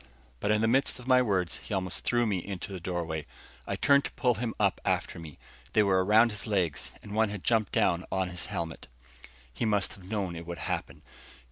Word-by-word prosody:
But 100 - -1
in 105 0 +3
the 110 - +3
midst 135 +4 +2
of 125 - -11
my 130 -1 +5
words, 95 -7 0
he 105 - -5
almost 95 -1 -1
threw 120 0 +2
me 100 -4 0
into 100 +2 -6
the 95 - -5
doorway. 85 -3 -3 0.4
I - - -1
turned 140 0 +4
to - - -4
pull 125 -3 +2
him 115 +1 -3
up 100 -3 +2
after - - -1
me. 80 -3 -10 0.4
They 105 - +5
were 95 -2 +3
around 110 +4 +5
his 105 0 -3
legs, 90 -9 0
and 105 - -8
one 110 0 +3
had 100 -3 -6
jumped 110 -4 +2
down 85 0 +3
upon 95 -1 -1
his 90 -1 -3
helmet. 85 -5 -5 0.3
And - - -14 0.3
he - - -4
must 105 -2 +1
have 100 - -14
known 100 -5 -2
it 85 0 -8
would 85 0 -5
happen. - - -4
100 Hz, 225 wpm, -29 LUFS, 90-110 Hz, 0.4 s, my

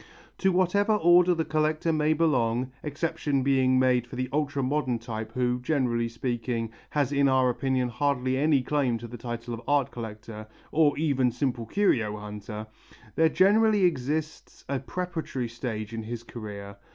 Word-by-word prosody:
To 190 - +3
whatever 185 +4 +2
order 180 -1 +5
a 160 -1 -1
collector 155 +1 0
may 155 0 +2
belong 130 -6 +1
exception 145 -2 -1
being 130 -1 +3
made 125 -2 +2
for 125 - -9
the 130 0 -2
ultra 140 -2 0
modern 130 -2 0
type 110 -1 -6
who, 125 0 0
generally 125 -4 0
speaking, 115 -1 -3 0.2
has 145 -3 0
in 140 -1 +3
our 130 -1 +3
opinion 130 0 0
hardly 130 +1 0
any 140 -1 +2
claim 130 -3 0
to 120 +1 -8
the 120 0 -9
title 120 0 -5
of 115 - -6
art 145 -3 +2
collector 110 -1 -8 0.2
or 150 -3 +3
even 140 -5 +2
simple 120 -2 -2
curio 115 - +1
hunter 105 0 -7 0.5
there 160 0 +4
generally 205 +4 +4
exists 155 -1 -2
a 140 -1 -1
preparatory 160 -5 -4
stage 115 -2 -5
in 115 - -3
his 115 +1 -6
career. 100 -4 -8
130 Hz, 160 wpm, -27 LUFS, 115-155 Hz, 0.5 s, order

